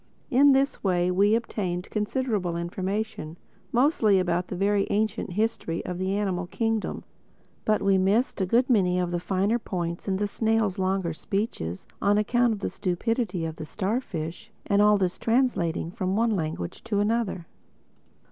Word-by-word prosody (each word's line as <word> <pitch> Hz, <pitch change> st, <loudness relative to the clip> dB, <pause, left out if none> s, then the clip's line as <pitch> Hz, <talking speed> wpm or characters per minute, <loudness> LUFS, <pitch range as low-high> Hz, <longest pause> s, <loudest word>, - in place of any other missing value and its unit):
In 280 Hz, +3 st, +6 dB
this 270 Hz, +1 st, +1 dB
way 180 Hz, -2 st, +2 dB
we 200 Hz, +4 st, +4 dB
obtained 190 Hz, -6 st, -2 dB
considerable 210 Hz, -5 st, -1 dB
information, 185 Hz, -1 st, -3 dB, 0.3 s
mostly 235 Hz, -6 st, +3 dB
about 180 Hz, -1 st, 0 dB
the -, -, -5 dB
very 200 Hz, +2 st, +1 dB
ancient 215 Hz, -2 st, -1 dB
history 210 Hz, -5 st, -1 dB
of 180 Hz, -1 st, -4 dB
the 190 Hz, +2 st, 0 dB
Animal 185 Hz, -4 st, -1 dB
Kingdom; 225 Hz, +2 st, -2 dB, 0.6 s
but 215 Hz, 0 st, +2 dB
we 195 Hz, -1 st, +4 dB
missed 200 Hz, +4 st, +1 dB
a 190 Hz, -, +1 dB
good 240 Hz, +6 st, +3 dB
many 185 Hz, -7 st, +3 dB
of 180 Hz, -1 st, 0 dB
the 175 Hz, -, -1 dB
finer 195 Hz, +6 st, 0 dB
points 175 Hz, -5 st, -4 dB
in 190 Hz, -1 st, +1 dB
the 205 Hz, -, 0 dB
snail's 220 Hz, -2 st, 0 dB
longer 190 Hz, -2 st, 0 dB
speeches 155 Hz, -, -3 dB, 0.2 s
on 205 Hz, +1 st, +3 dB
account 240 Hz, +3 st, +2 dB
of 215 Hz, -, -2 dB
the -, -, -1 dB
stupidity 185 Hz, -1 st, -1 dB
of 160 Hz, -1 st, -5 dB
the 155 Hz, -, -6 dB
starfish 190 Hz, -5 st, -3 dB, 0.2 s
and 200 Hz, 0 st, +3 dB
all 210 Hz, 0 st, +6 dB
this 185 Hz, -2 st, -1 dB
translating 225 Hz, -9 st, +1 dB
from 190 Hz, -2 st, -2 dB
one 230 Hz, +1 st, +2 dB
language 155 Hz, -, -3 dB
to 205 Hz, -2 st, 0 dB
another. 205 Hz, -4 st, 0 dB
195 Hz, 160 wpm, -26 LUFS, 180-220 Hz, 0.6 s, In